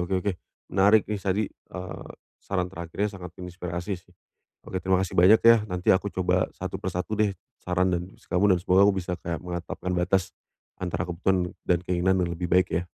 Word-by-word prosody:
Oke 90 +2 0
oke. 100 - +1 0.4
Menarik 100 +3 +5 0.2
tadi, 100 +2 -1
eee, 90 -1 -9 0.3
saran 90 -1 -2
terakhirnya 95 +4 -3
sangat 90 -2 -8
menginspirasi, 90 +1 -5 0.2
sih. - - -22 0.5
Oke, 95 - -4
terima 95 +1 +2
kasih 95 - -8
banyak, 105 +5 +7
ya. 115 0 +9
Nanti 90 0 +2
aku 95 +2 +1
coba 90 -1 +1
satu 95 0 -4
per - - -3
satu 90 +4 -3
deh 105 -2 +2 0.3
saran 90 +1 +1 0.3
kamu 95 +1 +3
dan - - -2
semoga 95 +3 +5
aku 100 - +3
bisa 90 -1 -3
kayak 85 -1 -3
menetapkan 90 +1 -4
batas 95 +2 +1 0.5
antara 90 -1 -2
kebutuhan 90 +1 0 0.2
dan 90 -2 +3
keinginan 90 +1 +2
yang 85 - -3
lebih 90 0 -3
baik, 90 +1 +4
ya. 85 - +1
90 Hz, 180 wpm, -26 LUFS, 90-95 Hz, 0.5 s, ya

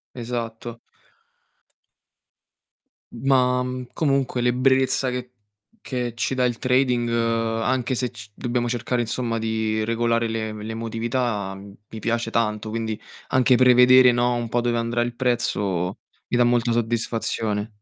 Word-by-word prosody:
Esatto. 120 -1 -5 2.3
Ma, 125 -2 +2 0.3
comunque 135 -4 0
l'ebbrezza 130 +2 +2
che 125 0 -5 0.5
che 125 -3 -3
ci 120 +3 -2
dà 130 - +1
il 120 -2 0
trading, 125 -2 +2
anche 115 +2 0
se 125 0 -2
c 110 -3 -11
dobbiamo 120 0 -1
cercare 120 +1 -1
insomma 115 0 -2
di 110 -1 -1
regolare 115 0 +1
l'e 110 -1 -3
l'emotività, 115 -1 -3
mi 100 +2 -12
piace 115 +1 -1
tanto, 105 -2 0
quindi 110 -1 -3 0.3
anche 130 0 +4
prevedere, 125 0 +7
no, 120 0 +1
un 120 -1 -3
po' 120 - +1
dove 120 0 0
andrà 115 +1 0
il 120 0 -2
prezzo, 100 -7 -1 0.3
mi 120 - 0
dà 120 - +5
molta 120 -1 +2
soddisfazione. 115 -2 -1
120 Hz, 125 wpm, -23 LUFS, 115-125 Hz, 2.3 s, prevedere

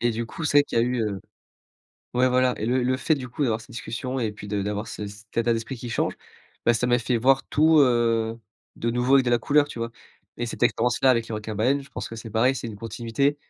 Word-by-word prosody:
et 120 - +2
du 115 +1 -3
coup, 160 +8 -7
c'est 145 -1 +4
vrai - - +7
qu'il - - -1
y - - +5
a - - +3
eu, 125 0 -1
heu 100 -3 -2 0.9
ouais, 125 +1 +4
voilà 125 0 +3
et 110 - -3
le 125 +2 +1
le 130 +1 +1
fait, 155 +4 +1
du 130 -3 -6
coup, 135 +5 -4
d'avoir 115 -4 +1
ces 110 - -15
discussions 125 +3 -4
et 110 -4 -1
puis 105 0 -10
de 100 -1 -1
d'avoir 105 +2 -3
ce 105 - -5
cet 105 +1 -13
état 115 0 +2
d'esprit 115 +3 -3
qui 120 0 -7
change, - - 0 0.5
bah, 120 - +5
ça 120 +2 0
m'a 120 0 +3
fait 120 +1 0
voir 135 +3 +3
tout, 155 +1 +5
heu, 115 -3 +2 0.4
de 115 - -1
nouveau 125 +3 +2
avec 135 -1 +5
de - - +2
la 120 - +4
couleur, 145 +4 +3
tu 120 - -8
vois 115 0 -3 0.5
et 120 - -1
cette 115 - -7
expérience-là 120 +2 +3
avec 115 -2 +1
les 110 - -4
requins 105 0 -5
baleines 130 +7 +2
je 140 - -17
pense - - -5
que - - -8
c'est 115 0 -8
pareil, 120 +5 +3
c'est 120 -2 -5
une 110 - -8
continuité 115 +6 -1
120 Hz, 270 wpm, -25 LUFS, 115-130 Hz, 0.9 s, vrai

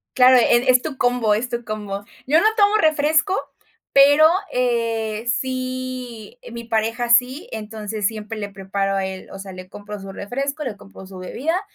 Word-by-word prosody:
Claro, 255 0 +7
e 245 +1 +4
es 250 0 +4
tu 310 -4 -5
combo, 245 -3 +2
es 230 +4 -1
tu 235 -1 -4
combo. 205 -2 -5 0.2
Yo 305 +5 +4
no - - +1
tomo 415 -1 +4
refresco, 315 +2 +2 0.6
pero, 285 +3 +6 0.3
eh, 230 -2 -1
sí 255 -3 -4 0.2
mi 235 0 -6
pareja 230 +1 -1
sí, 250 +5 +2
entonces 215 -1 -3
siempre 220 0 -6
le 205 - -3
preparo 195 0 -2
a 195 -1 0
él, 190 0 -7
o 195 - -9
sea, 195 -1 -8
le 185 0 -10
compro 205 +2 -9
su 195 0 -9
refresco, 275 +9 -4
le 240 -7 -5
compro 195 -1 -13
su 190 0 -11
bebida 300 - -2
235 Hz, 175 wpm, -21 LUFS, 210-255 Hz, 0.6 s, Claro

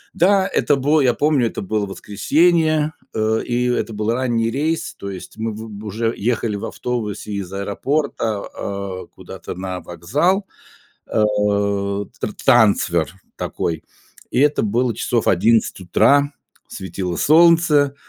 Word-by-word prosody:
Да, 190 +2 +4
это 145 -6 +1
было, 145 +3 +2
я 130 -3 +4
помню, 145 -2 +2
это - - -6
было 105 +1 -1
воскресенье, 155 - +1 0.2
э, 110 0 +1
и 125 0 0
это 115 -2 -1
был 105 +2 -1
ранний 120 -2 0
рейс, 155 +7 -2
то 100 - -7
есть 95 +2 -9
мы 110 0 -2
вы 110 +2 -7
б 105 0 -9
уже 115 +2 -1
ехали 115 -1 -1
в 100 - -5
автобусе 110 -4 -4
из 100 -2 -4
аэропорта, 110 +3 -1 0.2
а, 100 -2 -5
куда-то - - -9
на 90 -1 -4
вокзал, 150 - 0 0.6
а, 110 - 0 1.0
тра - - -2
трансфер 95 -7 +3 0.2
такой, 80 -2 -3 0.5
и 125 - +2
это 145 0 +3
было 120 +3 +1
часов 120 -2 0
11 110 +5 +3
утра, 140 +10 +3 0.3
светило 95 -2 -5
солнце, 155 - +4
115 Hz, 135 wpm, -20 LUFS, 100-145 Hz, 1.0 s, Да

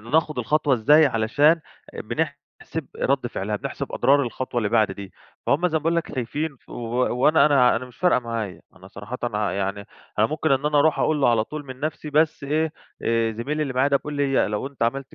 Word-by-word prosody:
ناخد 150 +6 0
الخطوة 145 +3 +2
إزاي 150 +7 +5
علشان 145 +7 +3 0.3
بنحسب 145 +3 -5
رد 135 -2 0
فعلها، 105 -2 -3
بنحسب - - -6
أضرار 140 +1 +3
الخطوة 125 0 -3
اللي 110 -3 0
بعد 110 -2 +2
دي، 95 -2 -9 0.3
فهُم 170 +6 +2
زي 160 -2 0
ما - - -13
باقول 165 +2 +1
لك 170 - -2
خايفين 140 +4 -3
ف - - -36
و - - -8 0.4
وأنا 150 +6 +5
أنا 135 -5 +4
أنا 120 - -4
مش 125 - -17
فارقة 180 -5 +3
معايا، 115 -5 -5
أنا 95 - -14
صراحةً 105 +6 -8 0.3
يعني 100 +1 -3 0.3
أنا 110 - +5
ممكن 155 +2 0
إن 135 +2 +1
أنا 150 -1 +2
أروح 155 +2 +3
أقول 155 -2 +1
له 135 - +4
على 115 -2 +2
طول 150 +3 -7
من 130 -1 -9
نفْسي 150 0 -4
بس 150 0 +1
إيه، 155 +2 0 0.3
آآ 115 -1 +1
زميلي 145 +8 -2
اللي 140 -3 -3
معايا 130 +2 +3
ده 140 - +3
بيقول 150 +2 -6
لي 140 -4 +1
لو 105 +5 -3
أنت 140 -3 -6
عملت 135 +3 -2
135 Hz, 210 wpm, -23 LUFS, 115-150 Hz, 0.4 s, إزاي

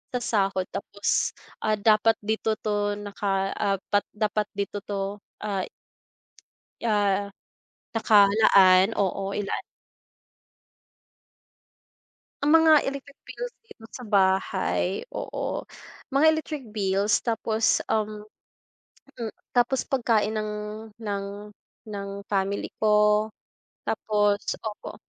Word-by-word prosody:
sa - - +1
sahod. 195 -5 +1
Tapos, 200 0 -1 0.2
ah, 215 0 +1
dapat 215 +1 +4
dito 220 +1 0
'to 205 -1 0
naka 200 -1 -2
ah, 200 -2 +2 0.2
dapat 205 0 +3
dapat 210 0 0
dito 200 0 -3
'to, 200 0 -4 0.2
ah 195 -3 -2 1.2
ah, 205 -3 +1 0.7
nakalaan. 200 -2 +6
Oo, 195 0 -1
ilaan 205 -1 -2 2.8
Ang 295 - +3
mga 320 -2 +6
electric 280 +1 -6
bills - - -6
dito 225 - -14
sa 250 - -9
bahay. 190 -2 +1
Oo, - - -4 0.5
mga 280 +3 +4
electric 305 -5 -2
bills. 200 0 +1
Tapos, 225 -1 +1
um, 215 -1 -1 0.9
mm, 230 -2 -4 0.2
tapos 245 +2 +2
pagkain 225 -5 +1
ng 215 0 -2 0.5
ng 205 -3 -3 0.6
ng 200 -2 -5 0.2
family 195 0 -1 0.2
ko. 210 0 +4 0.5
Tapos 205 -2 +1 0.2
opo, 215 -2 -6
210 Hz, 100 wpm, -26 LUFS, 200-225 Hz, 2.8 s, nakalaan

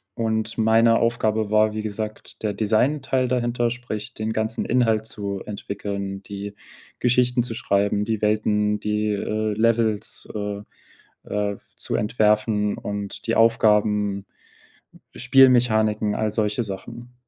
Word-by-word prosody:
und 110 -1 -1
meine 115 +1 +4
Aufgabe 110 -2 0
war, 110 0 +3
wie 110 - -3
gesagt, 110 0 -6
der 105 -1 0
Designteil 125 +5 +1
dahinter, 120 -1 0
sprich, 120 -4 -6
den 110 +1 -3
ganzen 110 +1 -1
Inhalt 115 -3 +2
zu 100 -3 -4
entwickeln, 100 -1 -5
die 100 +1 -7 0.4
Geschichten 125 0 +2
zu 115 - -4
schreiben, 105 -3 0
die 110 -2 -2
Welten, 105 0 +1
die, 105 0 -1
äh, 110 +1 -1
Levels, 110 -1 0
äh, 105 -1 -4 0.6
äh, 105 -1 -2 0.2
zu - - -3
entwerfen 105 -1 +1
und 100 +2 -6
die 115 - +1
Aufgaben, 105 -3 +3 0.9
Spielmechaniken, 120 -5 +4
all 110 -1 0
solche 105 +2 0
Sachen. 115 +5 -8
110 Hz, 120 wpm, -23 LUFS, 105-115 Hz, 0.9 s, meine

